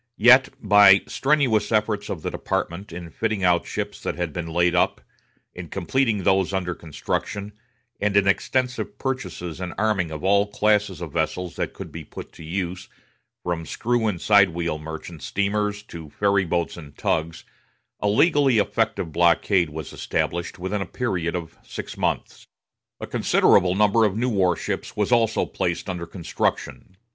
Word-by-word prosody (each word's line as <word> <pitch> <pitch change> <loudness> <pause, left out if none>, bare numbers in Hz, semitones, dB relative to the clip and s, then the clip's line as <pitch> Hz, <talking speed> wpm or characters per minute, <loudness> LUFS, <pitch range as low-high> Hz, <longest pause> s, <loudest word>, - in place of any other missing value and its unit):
Yet 130 +4 +7
by 100 -2 +7
the - - -14
strenuous 135 -7 +2
efforts 105 -1 0
of 80 - -5
the - - -2
department 85 +4 -3
in 85 -1 -8
fitting 110 -1 -2
out 90 -1 +3
ships - - -4
that - - -3
had 85 -4 -3
been 85 -2 -4
laid 85 +1 +2
up, 90 - +2 0.5
in 90 -1 -8
completing 110 +2 0
those 95 0 +2
under 90 -2 -1
construction, 100 +5 -4 0.5
and 100 -1 +1
in 100 -1 +4
extensive 125 +5 0
purchases 130 - -4
and 90 -1 -5
arming 105 -5 +1
of 75 -1 -7
all 100 +2 +3
classes 105 -4 +1
of 80 -5 -6
vessels 85 +2 -2
that - - -2
could - - -9
be - - -7
put - - -10
to - - -13
use, 90 +2 -4 0.5
from 85 -2 -2
screw 120 +6 -1
and 95 -5 -1
side 100 -1 +5
wheel 85 -2 -3
merchant 80 +1 -8
steamers 105 +4 -1
to 80 -6 -10
ferry 100 +2 +1
boats 85 0 -1
and 75 -4 -12
tugs, 80 +1 -1 0.6
a 105 - 0
legally 140 +2 +4
effective 110 -5 0
blockade 85 +2 +3
was 75 -1 -7
established 85 +1 -2
within 95 +3 -3
a 95 - -4
period 90 -6 -2
of 85 -3 -6
six - - -7
months. - - -3 0.5
A - - -5
considerable 90 0 +3
number 105 +2 +4
of 105 -1 0
new 125 +3 +1
war 95 -5 +2
ships - - -4
was 105 +3 0
also 115 -2 +3
immediately - - -5
placed 85 +3 -1
under 85 -2 -5
construction. 90 +1 -3
95 Hz, 170 wpm, -23 LUFS, 85-105 Hz, 0.6 s, Yet